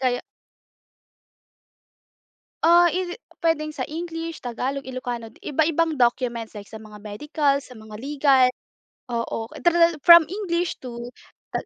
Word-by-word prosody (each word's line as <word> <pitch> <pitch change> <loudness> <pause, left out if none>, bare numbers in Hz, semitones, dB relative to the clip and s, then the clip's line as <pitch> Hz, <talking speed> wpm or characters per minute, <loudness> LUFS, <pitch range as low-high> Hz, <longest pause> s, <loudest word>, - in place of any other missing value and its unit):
kaya 250 -2 +1 2.5
Ah, 345 +1 +7
is 365 -1 -2
it 480 - -8 0.2
puwedeng 305 -2 0
sa - - -3
English, 330 0 -5
Tagalog, 260 +3 -4
Ilocano. 245 -3 -5 0.2
Iba-ibang 315 0 +1
documents 235 -2 0
like 205 - -7
sa 220 - -8
mga 215 -1 -13
medical, 280 +6 0
sa 250 - -14
mga 215 -1 -11
legal. 275 -1 +3 0.7
Oo. 230 -1 -3
Tral 340 -2 +3
from 340 +1 +9
English 355 -4 -2
to 240 -1 -8 0.4
tag - - -3
280 Hz, 125 wpm, -23 LUFS, 240-330 Hz, 2.5 s, from